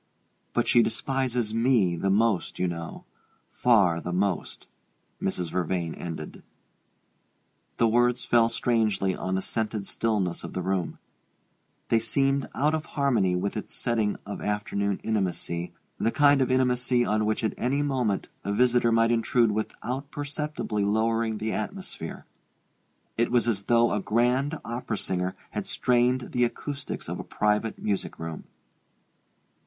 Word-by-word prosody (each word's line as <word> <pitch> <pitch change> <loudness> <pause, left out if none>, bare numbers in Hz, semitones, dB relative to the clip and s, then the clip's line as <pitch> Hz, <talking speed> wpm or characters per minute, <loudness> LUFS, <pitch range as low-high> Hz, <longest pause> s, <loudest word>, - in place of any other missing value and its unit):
But - - +1
she 120 - +6
despises 125 -1 -1
me 115 -6 +3
the 95 +4 -1
most, 105 -1 +1
you 90 - +1
know 85 -1 -6 0.5
far 100 -9 +3
the 90 - -4
most 95 0 -1 0.3
" - - -42
Mrs. 90 -3 -2
Vervain 85 -2 -1
ended. 80 -3 -7 1.4
The 115 - +4
words 120 +2 +2
fell 115 -1 +4
strangely 110 -5 +1
on 95 0 -2
the 95 - -1
scented 110 -3 -2
stillness 100 -7 -1
of - - -7
the 90 - -3
room: 95 -1 -1 0.9
they 115 - +4
seemed 135 +4 +1
out 150 +3 +2
of 155 -1 -2
harmony 120 -10 +2
with 90 +3 -2
its 110 - -6
setting 110 -3 0
of 100 - -6
afternoon 100 -1 -1
intimacy, 90 -5 -1 0.3
the - - +2
kind 145 +1 +4
of 130 - +2
intimacy 125 -1 +2
on 110 0 +1
which 110 +2 0
at 110 - +1
any 140 +4 0
moment, 125 -8 0 0.2
a 100 - -2
visitor 120 +2 +3
might 115 0 +4
intrude 115 0 +3
without 125 +5 -3
perceptibly 145 -7 -3
lowering 110 +2 +1
the 110 +1 -2
atmosphere. 110 - -5 0.9
It 115 - +3
was 120 -1 +3
as 105 -4 +1
though 120 0 +4
a 105 - 0
grand 125 +8 +1
opera 115 -1 -3
singer 90 -1 -1 0.2
had - - -4
strained 125 0 +2
the 125 - +2
acoustics 140 +3 -4
of - - -4
a - - -4
private 105 +1 0
music 100 -2 -2
room. 80 -1 -6
115 Hz, 145 wpm, -27 LUFS, 100-125 Hz, 1.4 s, she